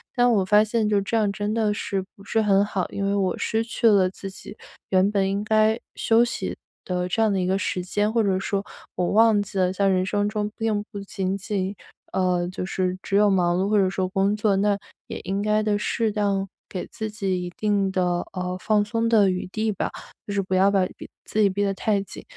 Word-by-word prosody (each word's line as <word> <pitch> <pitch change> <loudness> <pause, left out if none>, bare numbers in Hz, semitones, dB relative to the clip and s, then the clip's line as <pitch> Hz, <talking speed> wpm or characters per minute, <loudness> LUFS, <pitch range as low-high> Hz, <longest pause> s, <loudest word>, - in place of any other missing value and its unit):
但 245 0 +4
我 195 -4 +2
发 210 +2 +5
现 220 0 0
就 205 -1 +2
这 225 +4 -1
样 210 -2 +2
真 205 +1 -3
的 215 -2 +1
是 195 -2 -2
不 200 - -16
是 225 - 0
很 200 -1 +4
好， 195 -3 -2
因 200 - -4
为 200 +1 +1
我 190 -2 +1
失 225 +1 0
去 230 0 0
了 195 -4 +5
自 195 0 -8
己 195 +2 -10 0.3
原 190 +2 +3
本 195 -2 +1
应 200 +1 -1
该 220 +1 +3 0.2
休 230 +1 +3
息 240 - -3 0.3
的 180 -1 -1
这 225 +5 0
样 220 -2 +3
的 190 - 0
一 - - 0
个 190 +1 +2
时 180 -1 -2
间。 205 +3 0
或 230 -2 +3
者 190 -2 +1
说 200 0 -2 0.3
我 180 -1 0
忘 220 -1 +5
记 200 -1 -6
了 185 -1 +2
在 195 +1 +1
人 185 0 +2
生 205 +1 0
中 210 -1 -2
并 220 -2 0
不 200 - -6
仅 195 -1 -3
仅， 195 0 -3 0.4
呃， 180 -2 +1
就 185 0 -5
是 185 -1 -1
只 200 - -3
有 210 0 +5
忙 175 -2 +2
碌 195 - +1
或 215 - +3
者 190 -2 +3
说 185 -1 -1
工 195 +2 +1
作， 210 -2 +1
那 205 0 +2 0.3
也 - - -6
应 195 +2 -1
该 215 +1 +2
地 210 -1 +1
适 220 0 0
当 200 -2 0 0.2
给 185 - -4
自 220 -1 -5
己 195 -3 -2
一 175 - -4
定 205 -2 +1
的， 180 -2 +1
呃， 180 0 -3
放 210 0 +2
松 230 +1 -1
的 210 -4 +5
余 185 0 -3
地 215 +3 -1
吧， 195 - -2 0.4
就 205 - -3
是 200 - +1
不 190 - -4
要 195 +2 +5
把 195 -2 +2
逼 - - -10 0.2
自 215 - -3
己 200 - +5
逼 200 +2 -1
得 195 -1 +1
太 200 +1 0
紧。 - - -10
200 Hz, 255 characters per minute, -24 LUFS, 190-210 Hz, 0.4 s, 发